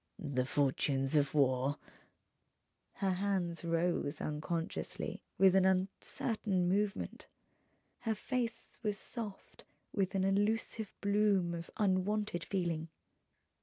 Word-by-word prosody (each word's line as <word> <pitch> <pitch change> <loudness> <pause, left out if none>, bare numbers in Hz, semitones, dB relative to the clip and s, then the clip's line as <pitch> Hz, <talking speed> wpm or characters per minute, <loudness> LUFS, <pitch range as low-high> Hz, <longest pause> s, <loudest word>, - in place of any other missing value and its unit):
"The 130 -5 -1
fortunes 135 0 +1
of 145 0 +3
war 135 0 +3 0.6
..." - - -48
Her 190 - +3
hands 185 -3 -1
rose 170 -3 0
unconsciously, 160 +2 -3 0.2
with 190 -1 +6
an 190 - +6
uncertain 190 +1 +1
movement. 200 +3 -1 0.7
Her 225 -2 -1
face 235 0 -3
was 210 -3 0
soft 215 -2 -6 0.3
with 195 -1 0
an 190 - +2
elusive 205 +2 +1
bloom 200 -4 +3
of 170 0 -5
unwonted 200 -1 +1
feeling. 170 -4 -1
185 Hz, 105 wpm, -34 LUFS, 165-205 Hz, 0.7 s, with